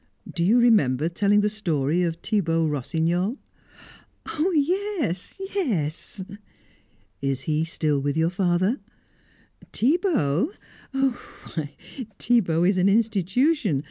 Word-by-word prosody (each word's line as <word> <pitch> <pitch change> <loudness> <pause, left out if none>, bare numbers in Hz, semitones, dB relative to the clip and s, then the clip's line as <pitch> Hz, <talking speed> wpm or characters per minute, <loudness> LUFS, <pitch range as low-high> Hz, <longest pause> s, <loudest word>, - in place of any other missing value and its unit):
Do 170 - -1
you 210 +7 +4
remember 165 - +3
telling 205 +4 +2
the 210 - +2
story 170 -7 0
of 170 -2 0
Thibaut 165 -5 0
Rossignol?" 170 - -1 0.9
"Oh 325 +3 -1
yes, 340 - -1
yes!" 195 - -2 1.0
"Is 135 -1 -1
he 155 +3 0
still 155 -3 -1
with 145 +2 -1
your 165 +1 +2
father?" 185 +5 +1 0.9
"Thibaut? 280 - +1 0.3
Why, 245 - -4 0.4
Thibaut 175 -8 +2
is 195 0 +2
an 185 +2 +4
institution. 220 - +2
185 Hz, 105 wpm, -24 LUFS, 160-240 Hz, 1.0 s, you